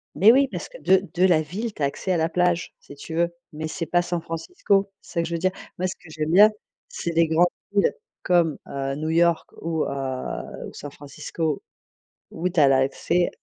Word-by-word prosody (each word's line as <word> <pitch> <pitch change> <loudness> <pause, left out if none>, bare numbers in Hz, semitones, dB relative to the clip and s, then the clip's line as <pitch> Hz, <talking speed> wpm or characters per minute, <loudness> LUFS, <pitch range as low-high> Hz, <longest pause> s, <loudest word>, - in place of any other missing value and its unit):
Mais 210 +4 +7
oui, 270 +2 +5
parce - - -5
que - - -11
de 190 +1 +3
de 180 +1 +3
la 170 -4 +4
ville, 205 +9 -4
tu - - -10
as - - +5
accès 185 +6 -2
à 180 - +2
la 160 0 +1
plage, 175 0 +1
si 145 - -13
tu 160 +3 -8
veux, 170 +1 +1 0.2
mais 155 +1 -4
c'est 165 +1 -4
pas 175 +1 +2
San 175 -1 -2
Francisco, 195 - 0
c'est - - -15
ça 170 - +1
que - - -3
je 170 - -2
veux - - -2
dire. 185 +2 +2 0.3
Moi 185 - 0
ce 185 - -5
que 160 - -17
j'aime 155 0 -3
bien, 205 +5 +8 0.4
c'est 170 - -4
des 165 0 +3
grandes 160 +2 +4 0.3
villes 200 -1 +3 0.3
comme, 170 -4 +3
heu, 135 0 -3
New-York 160 +2 +2
ou, 160 -1 -1
heu, 130 -2 -4
San 145 0 -8
Francisco, 145 +2 -4 0.7
où 175 +3 -2
tu 175 - 0
as 145 - +7
l'accès 135 +6 +2
170 Hz, 215 wpm, -24 LUFS, 155-180 Hz, 0.7 s, bien